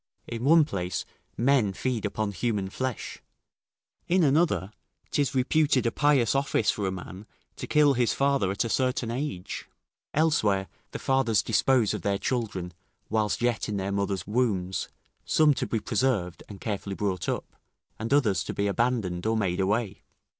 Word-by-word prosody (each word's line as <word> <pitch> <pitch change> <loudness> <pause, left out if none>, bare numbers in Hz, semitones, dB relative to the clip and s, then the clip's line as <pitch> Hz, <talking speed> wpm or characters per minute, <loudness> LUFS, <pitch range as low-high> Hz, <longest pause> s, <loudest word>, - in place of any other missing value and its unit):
In 115 0 -5
one 160 +1 +6
place, 90 - -3 0.3
men 120 -5 +3
feed 120 +1 -2
upon 105 0 -2
human 100 -1 -2
flesh; 130 +1 -4 0.9
in 180 0 +3
another, 145 - +2 0.4
'tis 145 -2 0
reputed 135 0 +2
a 115 - +2
pious 140 -5 +3
office 135 -5 +2
for 100 -2 -2
a - - -1
man 95 +2 -8 0.3
to - - -6
kill 150 -2 +4
his 120 -2 +2
father 140 -8 +1
at 100 +4 0
a - - -2
certain 125 -2 0
age; 125 -8 -4 0.5
elsewhere, 110 -12 +2 0.2
the - - -6
fathers 130 -5 +2
dispose 115 0 +2
of - - -4
their 100 -1 0
children, 100 -8 -3 0.4
whilst 110 +1 0
yet 120 -3 0
in 105 - -2
their 95 +1 -2
mothers' 100 -1 -1
wombs, 105 -5 0 0.4
some 155 -2 +4
to - - -3
be 115 - -1
preserved 105 -6 0
and 100 -2 -9
carefully 100 -2 -4
brought 95 -4 -2
up, - - -4 0.4
and 115 +3 -4
others 110 - +3
to - - -5
be 100 - 0
abandoned 100 -4 0
or 110 0 +2
made 95 -4 0
away. 105 +1 0
110 Hz, 160 wpm, -27 LUFS, 100-130 Hz, 0.9 s, one